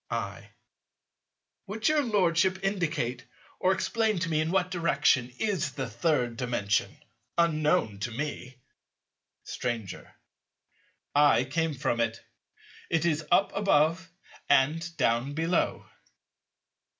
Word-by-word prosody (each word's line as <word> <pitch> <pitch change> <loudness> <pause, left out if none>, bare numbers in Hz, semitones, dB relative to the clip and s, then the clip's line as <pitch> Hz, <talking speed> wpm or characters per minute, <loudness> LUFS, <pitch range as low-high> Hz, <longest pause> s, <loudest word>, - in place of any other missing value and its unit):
I. - - -4 1.2
Would 215 +2 -2
your 305 -1 +3
Lordship 185 - +1
indicate 160 -11 -1 0.4
or 185 - +3
explain 220 +2 0
to 165 - -1
me 155 -1 +1
in 155 - -1
what 180 0 +1
direction 145 -7 +2
is 180 -9 -1
the 135 -3 -4
Third 120 0 0
Dimension, 120 -5 -1 0.4
unknown 155 - +2
to 100 - -3
me? 130 0 -5 0.9
Stranger. 115 -6 -5 1.0
I 145 -5 +5
came 155 +4 -1
from 120 -3 -1
it. 115 0 0 0.7
It 165 -1 +1
is 155 -2 +1
up 195 - +3
above 185 -1 +2 0.4
and 160 +5 +2
down 125 +1 +1
below. 165 +2 0
155 Hz, 110 wpm, -28 LUFS, 125-180 Hz, 1.2 s, I